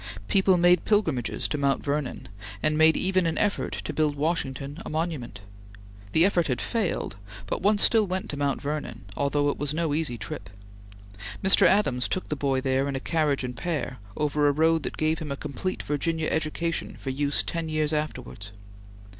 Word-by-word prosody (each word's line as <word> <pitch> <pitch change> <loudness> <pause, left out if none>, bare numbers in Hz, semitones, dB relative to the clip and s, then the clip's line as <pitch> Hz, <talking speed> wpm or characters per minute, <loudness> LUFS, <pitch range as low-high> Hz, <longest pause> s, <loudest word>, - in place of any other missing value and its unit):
People 190 -2 +4
made 175 0 +5
pilgrimages 160 - +1
to 150 - -2
Mount 140 -1 +1
Vernon 145 -2 -2 0.4
and 155 0 +2
made 160 +1 +5
even 185 -2 +2
an 165 - -1
effort 205 -1 0
to 155 - -4
build 150 -1 +1
Washington 145 -1 -2
a - - -7
monument. 155 - -3 0.7
The 165 - +6
effort 180 -4 +2
had 125 -3 -1
failed, 210 - -2 0.3
but - - -3
one 205 +3 +3
still 215 0 +4
went 185 0 -3
to - - -4
Mount 140 -1 0
Vernon, 145 -7 -4
although 145 +1 +1
it - - -3
was 145 +1 -1
no 165 -3 0
easy 150 -6 0
trip. - - -7 0.9
Mr. 190 - +6
Adams 130 -12 +2
took 185 - -3
the 150 - -1
boy 135 -2 0
there 135 +1 +1
in 140 - -2
a - - -1
carriage 150 -2 0
and 125 -1 -4
pair, 130 -3 -3 0.2
over 150 0 +2
a - - +5
road 160 +2 +3
that - - -5
gave 155 +1 +1
him 150 -3 -5
a 140 - -3
complete 150 +7 -4
Virginia 160 +2 -1
education 160 +1 -2
for 135 - -5
use 140 +1 0
ten 165 -1 -3
years 155 0 0
afterwards. 125 -9 -4
150 Hz, 185 wpm, -26 LUFS, 140-165 Hz, 0.9 s, The